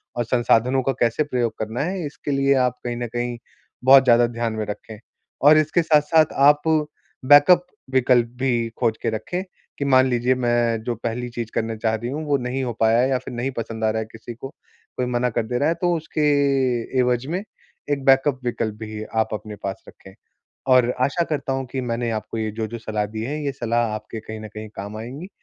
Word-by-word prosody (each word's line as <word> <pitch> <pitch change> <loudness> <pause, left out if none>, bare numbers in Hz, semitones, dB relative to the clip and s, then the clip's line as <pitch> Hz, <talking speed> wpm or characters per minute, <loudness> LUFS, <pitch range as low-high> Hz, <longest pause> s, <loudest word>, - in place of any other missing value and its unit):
और 120 - 0
संसाधनों 125 +2 +2
का 135 - +1
कैसे 120 +5 +2
प्रयोग 125 -5 -1
करना 110 +2 -3
है, 180 0 -3
इसके 145 0 -5
लिए 140 0 +3
आप 125 -2 +2
कहीं 120 -1 -3
न 120 0 -3
कहीं 120 0 -2 0.5
बहुत 135 +1 +8
ज़्यादा 120 -1 +5
ध्यान 115 -1 -3
में 110 -1 -3
रखें, 105 +1 -8 0.4
और 150 +2 +7
इसके 155 +3 +2
साथ-साथ 155 0 +3 0.2
आप 145 0 +3 0.6
बैकअप 145 +6 +7 0.3
विकल्प 125 -2 +4
भी 120 -3 +1
खोज 115 -3 +1
के - - 0
रखें 115 - -3 0.3
कि, 140 - -2
"मान 130 -1 +5
लीजिए, 125 0 +1
मैं 120 -2 +1
जो 120 0 -2
पहली 120 +2 -4
चीज़ 120 -2 -6
करने 115 0 -1
चाह 110 0 0
रही 120 +2 -4
हूँ, 150 +4 -4
वो 145 -1 +2
नहीं 125 +1 -3
हो 120 -2 -2
पाया 115 +1 +4
है 130 +2 +2
या 130 - +2
फिर - - -9
नहीं 120 +3 -2
पसंद 115 -1 -4
आ 110 - +3
रहा 110 - -2
है - - -4
किसी 115 +1 -9
को, 125 +3 -8 0.5
कोई 125 - 0
मना 125 0 0
कर 115 -1 -2
दे 125 - -1
रहा 145 - +2
है।" 165 - +1
तो 175 -1 +2
उसके 155 -1 -4 0.8
एवज 125 0 +1
में 190 - -3 0.5
एक 140 -1 -1
बैकअप 135 0 +4
विकल्प 110 -3 -2
भी 110 -1 -6 0.2
आप 110 - -2
अपने 105 0 -6
पास 95 -1 -4
रखें, - - -15 0.5
और 130 -2 +5
आशा 140 +7 +1
करता 140 -3 -1
हूँ 135 0 -2
कि 135 - -2
मैंने 120 0 -1
आपको 115 - -7
ये 110 -1 -1
जो-जो 110 +2 -5
सलाह 110 -2 -2
दी 110 +1 -6
है, 150 +5 -4
ये 140 - -1
सलाह 120 -2 0
आपके 110 +1 -7
कहीं 110 0 -8
न 110 - -8
कहीं 110 0 -7
काम 100 +2 -6
आएँगी 130 - -7
120 Hz, 215 wpm, -22 LUFS, 115-135 Hz, 0.8 s, बहुत